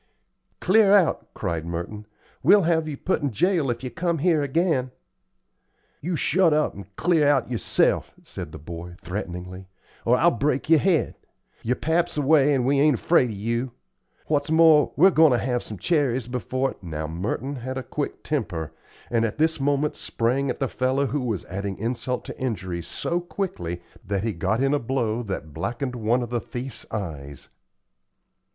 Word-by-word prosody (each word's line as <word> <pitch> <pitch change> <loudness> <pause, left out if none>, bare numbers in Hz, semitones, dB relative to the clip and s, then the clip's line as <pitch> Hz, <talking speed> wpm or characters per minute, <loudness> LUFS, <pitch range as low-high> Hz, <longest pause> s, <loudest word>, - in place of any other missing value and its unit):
"Clear 200 +1 +4
out," 185 -5 +2
cried 85 -5 -2
Merton. 85 +6 -5 0.3
"We'll 205 -1 +6
have 160 -1 +1
you 145 -2 -4
put 185 - -1
in 145 - 0
jail 160 - +1
if 120 +1 -3
you 130 - -4
come 170 -1 -1
here 160 0 +2
again." 145 -2 +1 1.1
"You 175 +3 -2
shut 165 +1 +3
up 155 - +1
and 100 0 -12
clear 165 -4 +3
out 135 -4 +2
yerself," 115 - +1
said - - -7
the - - -8
boy, 85 +3 -8
threateningly, 90 0 -6 0.4
"or 125 +2 +4
I'll 170 +5 +4
break 140 +4 -1
yer 160 - +7
head. 175 -4 +1 0.4
Yer 125 +3 0
pap's 170 +3 0
away, 145 0 +4
and 125 -2 +1
we 140 +1 +3
ain't 150 -1 +5
afraid 150 -8 +3
of 110 - -5
you. 115 +5 -2 0.5
What's 145 -1 0
more, 160 -2 +6
we're 190 +6 +6
goin' 160 -5 +5
ter - - +3
have 125 -2 0
some 105 - -8
cherries 130 - +1
before 130 +2 -2
" - - -36
Now 80 -4 -4
Merton 105 - -3
had 130 +2 -5
a 130 - -3
quick 145 +2 -4
temper, 95 - -2 0.4
and 115 -1 +2
at 115 - -2
this 160 0 +1
moment 145 +2 +1
sprang 130 +4 -1
at - - -2
the 135 - 0
fellow 130 +3 0
who 140 +2 -1
was 115 -7 -2
adding 100 +1 -4
insult 120 +3 -3
to - - -8
injury, 95 -8 -3
so 170 - -2
quickly 170 - -4 0.2
that 100 0 -2
he 110 -1 -1
got 95 +7 0
in 135 +1 +2
a 145 - +2
blow 120 -3 -1
that 95 -8 -5
blackened 120 - -3
one 120 +2 +1
of 120 - -7
the 120 -1 0
thief's 125 -1 -7
eyes. 75 - -6
130 Hz, 180 wpm, -24 LUFS, 105-150 Hz, 1.1 s, yer